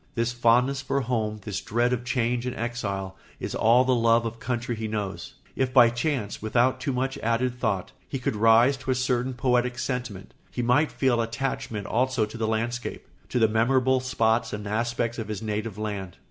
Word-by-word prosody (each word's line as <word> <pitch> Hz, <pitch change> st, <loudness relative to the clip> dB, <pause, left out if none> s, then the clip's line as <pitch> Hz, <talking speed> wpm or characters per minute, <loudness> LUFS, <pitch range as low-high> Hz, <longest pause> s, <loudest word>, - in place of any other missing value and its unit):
This 115 Hz, 0 st, 0 dB
fondness 125 Hz, +3 st, +3 dB
for 140 Hz, 0 st, -1 dB
home, 110 Hz, -4 st, -2 dB
this 100 Hz, -3 st, -4 dB
dread 120 Hz, +3 st, +1 dB
of 125 Hz, -1 st, -2 dB
change 125 Hz, 0 st, 0 dB
and 125 Hz, -, -3 dB
exile, 100 Hz, -5 st, -3 dB, 0.2 s
is -, -, -4 dB
all 120 Hz, +3 st, +4 dB
the 130 Hz, -, +3 dB
love 115 Hz, -1 st, +3 dB
of 115 Hz, 0 st, -5 dB
country 120 Hz, 0 st, -2 dB
he 110 Hz, 0 st, -4 dB
knows. 105 Hz, +5 st, -4 dB, 0.2 s
If 130 Hz, -1 st, 0 dB
by 120 Hz, -3 st, +7 dB
chance, 120 Hz, -3 st, -2 dB
without 120 Hz, +4 st, +2 dB
too 140 Hz, +1 st, -2 dB
much 135 Hz, +2 st, -2 dB
added 120 Hz, +2 st, 0 dB
thought, 100 Hz, -6 st, -1 dB, 0.2 s
he 135 Hz, -, -2 dB
could 125 Hz, -3 st, -2 dB
rise 115 Hz, +5 st, +5 dB
to 130 Hz, -, -8 dB
a 130 Hz, -, +3 dB
certain 130 Hz, 0 st, 0 dB
poetic 125 Hz, -1 st, +1 dB
sentiment, 120 Hz, -6 st, -4 dB, 0.2 s
he 125 Hz, -, -3 dB
might 125 Hz, +6 st, +3 dB
feel 125 Hz, -3 st, +1 dB
attachment 115 Hz, -2 st, -3 dB
also 130 Hz, -1 st, +1 dB
to 105 Hz, -, -11 dB
the 110 Hz, -, 0 dB
landscape, 115 Hz, +2 st, -2 dB, 0.2 s
to -, -, -1 dB
the 115 Hz, -2 st, +5 dB
memorable 130 Hz, +4 st, +2 dB
spots 115 Hz, -3 st, +1 dB
and 105 Hz, 0 st, -5 dB
aspects 115 Hz, +2 st, -1 dB
of 110 Hz, -, -4 dB
his 105 Hz, 0 st, -5 dB
native 105 Hz, -1 st, -3 dB
land. 100 Hz, -4 st, -5 dB
120 Hz, 190 wpm, -26 LUFS, 110-125 Hz, 0.2 s, by